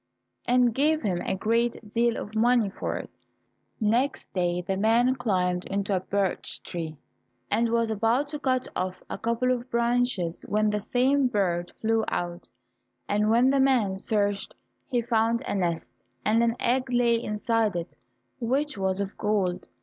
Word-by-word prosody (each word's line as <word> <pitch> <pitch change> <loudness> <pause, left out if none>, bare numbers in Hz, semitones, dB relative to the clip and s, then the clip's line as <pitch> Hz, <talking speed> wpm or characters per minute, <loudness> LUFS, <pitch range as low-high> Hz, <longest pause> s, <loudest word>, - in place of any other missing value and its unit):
and 245 -1 +3
gave 305 +5 +2
him 185 -5 0
a - - -1
great 230 +4 +1
deal 235 0 +2
of 210 - -6
money 230 -2 +3
for - - -3
it. - - -6 0.7
Next 240 +5 0
day 175 -1 0
the 190 +2 -2
man 230 +5 +3
climbed 180 -7 0
into 200 0 -1
a - - +1
birch 195 0 -2
tree, 160 -3 -5 0.5
and 230 0 +2
was 230 -1 +1
about 225 +6 +1
to 300 0 -5
cut 255 -3 0
off 185 0 -3
a - - -4
couple 235 +2 0
of 250 0 -2
branches 235 -7 0
when 215 0 +2
the 210 - 0
same 260 +5 +2
bird 180 -7 0
flew 225 0 +2
out, 175 0 -3 0.6
and 210 +1 +1
when 240 +4 +4
the 275 - +2
man 250 -8 +3
searched 205 0 -1 0.3
he 245 -3 0
found 230 +1 +1
a - - -3
nest, 175 -4 -2 0.3
and 220 +2 +3
an 235 0 +2
egg 255 +2 +1
lay 235 -1 +3
inside 215 -1 0
it, 170 0 -5 0.4
which 265 +1 -1
was 190 0 0
of 200 0 -3
gold. 200 -4 0
225 Hz, 165 wpm, -26 LUFS, 195-245 Hz, 0.7 s, when